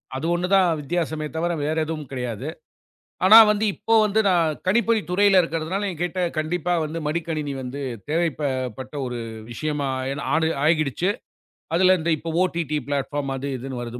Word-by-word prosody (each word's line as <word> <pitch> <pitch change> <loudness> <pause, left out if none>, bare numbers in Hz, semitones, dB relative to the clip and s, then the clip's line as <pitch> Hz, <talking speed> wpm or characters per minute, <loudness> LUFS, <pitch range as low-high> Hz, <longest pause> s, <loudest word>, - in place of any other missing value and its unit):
அது 135 +4 -3
ஒண்ணு 175 +1 -1
தான் 190 - +5
வித்தியாசமே 160 0 -2
தவர 170 +2 0
வேற 155 +1 -1
எதுவும் 155 -4 -5
கிடையாது. 125 -1 -4 0.8
ஆனா 215 +4 +9
வந்து 210 +1 +1
இப்போ 225 - 0
வந்து 210 +2 +2
நான் 165 -5 +2
கணிப்பொறித் 230 +1 +2
துறையில 195 +1 +5
இருக்குறதுனால 165 +5 -2
என்கிட்ட 175 +1 -3 0.2
கண்டிப்பா 170 +3 -1
வந்து 155 +2 -4
மடிக்கணினி 155 -2 -2
வந்து 130 +3 -6 0.3
தேவைப் 165 -1 0
ப - - -2 0.4
பட்ட 130 +2 -8
ஒரு 120 -1 -4 0.3
விஷயமா 145 +3 -2
ஆயி 135 +1 -3 0.2
ஆனு-ஆகிடுச்சு. 160 +1 +1 0.6
அதுல 185 +2 +5
இந்த 165 - -2
இப்போ 165 - -6
OTT 170 -4 -2 0.2
பில்டபார்ம் 140 0 -2
அது 135 +1 -4
இதுன்னு 125 0 -6
வருது. 120 +1 -6
160 Hz, 155 wpm, -23 LUFS, 140-180 Hz, 0.8 s, ஆனா